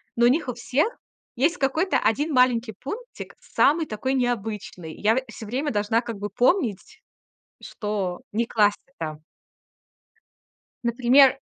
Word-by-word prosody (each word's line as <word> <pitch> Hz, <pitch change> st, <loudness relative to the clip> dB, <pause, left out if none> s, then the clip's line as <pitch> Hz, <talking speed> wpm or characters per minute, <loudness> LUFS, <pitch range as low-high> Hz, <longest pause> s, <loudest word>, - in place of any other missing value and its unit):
Но 235 Hz, -, +4 dB
у -, -, +7 dB
них 285 Hz, +3 st, +1 dB
у 250 Hz, -, -2 dB
всех 260 Hz, -, 0 dB, 0.5 s
есть 305 Hz, +8 st, +2 dB
какой-то 315 Hz, +7 st, +1 dB
1 290 Hz, +9 st, +1 dB
маленький 245 Hz, -3 st, +3 dB
пунктик, 475 Hz, -, -7 dB
самый 320 Hz, +3 st, +2 dB
такой 245 Hz, +4 st, -2 dB
необычный. 220 Hz, -9 st, -3 dB
Я 215 Hz, +2 st, +2 dB
в 260 Hz, -, 0 dB
всё 220 Hz, -, -9 dB
время 270 Hz, +7 st, -2 dB
должна 210 Hz, +1 st, +1 dB
как 230 Hz, -3 st, -6 dB
бы 205 Hz, +1 st, -4 dB
помнить, 255 Hz, -, 0 dB, 0.6 s
что 200 Hz, -5 st, -4 dB
не 230 Hz, +3 st, 0 dB
класть 210 Hz, -3 st, +3 dB, 0.2 s
это. 155 Hz, -2 st, -5 dB, 1.6 s
Например 250 Hz, +3 st, +5 dB
240 Hz, 135 wpm, -24 LUFS, 210-270 Hz, 1.6 s, у